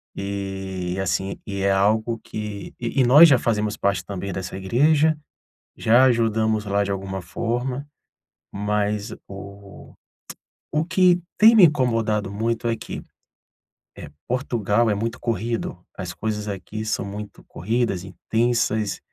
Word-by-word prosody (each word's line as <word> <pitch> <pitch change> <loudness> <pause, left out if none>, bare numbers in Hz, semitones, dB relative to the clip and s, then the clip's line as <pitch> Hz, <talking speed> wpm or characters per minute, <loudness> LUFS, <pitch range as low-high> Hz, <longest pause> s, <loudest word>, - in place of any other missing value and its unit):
e, 95 -2 -4
assim, 95 +1 -2
e 100 -1 -4
é 100 0 +2
algo 110 +4 +1
que 105 -2 -7
e 120 +3 -2
e - - +6
nós 150 +6 +9
já 130 -4 +5
fazemos 105 -2 -1
parte 100 0 0
também 100 -1 -5
dessa 95 0 -5
igreja, 150 +10 +3 0.6
já 120 +4 +5
ajudamos 110 -3 +2
lá 100 0 +1
de 100 - -3
alguma 95 -1 -4
forma. 120 - -3 0.7
Mas 105 +1 -1
o 100 0 -11 0.8
o 155 +1 +1
que 180 0 +3 0.2
tem 225 +2 +8
me 205 -5 +8
incomodado 115 -8 0
muito 115 +3 -2
é 115 - +2
que, - - -7 1.0
eh 75 - -9 0.2
Portugal 120 -3 +1
é 105 - +2
muito 115 +3 -3
corrido, 115 -4 -2 0.2
as 90 -2 -5
coisas 105 +3 -3
aqui 105 +2 -5
são 110 - -1
muito 105 +1 -8
corridas, 115 -5 -1
intensas 110 +1 0
105 Hz, 135 wpm, -23 LUFS, 100-120 Hz, 1.0 s, nós